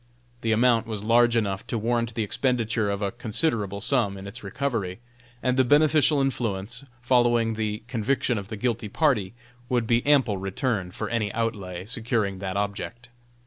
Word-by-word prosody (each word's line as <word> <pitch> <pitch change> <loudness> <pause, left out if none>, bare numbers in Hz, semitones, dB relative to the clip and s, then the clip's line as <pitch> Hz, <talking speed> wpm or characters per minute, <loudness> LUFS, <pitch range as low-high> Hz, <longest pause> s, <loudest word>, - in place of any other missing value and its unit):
The 115 - 0
amount 115 0 +3
was 105 -3 -4
large 120 +1 +4
enough 100 -4 -1
to 115 - -1
warrant 115 +1 -1
the 115 - 0
expenditure 115 -2 0
of 100 +1 -2
a 100 - 0
considerable 105 - -1
sum 105 -5 +2
in 95 - -9
its 100 - -8
recovery, 100 -3 -2 0.4
and 125 0 +1
the 130 - +5
beneficial 150 +2 +4
influence 120 -2 -2 0.2
following 120 -2 +3
the 110 -1 -3
conviction 125 0 0
of 100 - -8
the 110 0 -6
guilty 115 -1 -1
party 120 - +1 0.3
would 120 -2 +1
be 115 +1 +2
ample 130 -8 +3
return 95 0 -2
for 90 - -5
any 110 -3 -1
outlay 100 -6 -3
securing 110 -4 -1
that 95 0 -3
object. 100 +3 -4
115 Hz, 165 wpm, -25 LUFS, 100-125 Hz, 0.4 s, the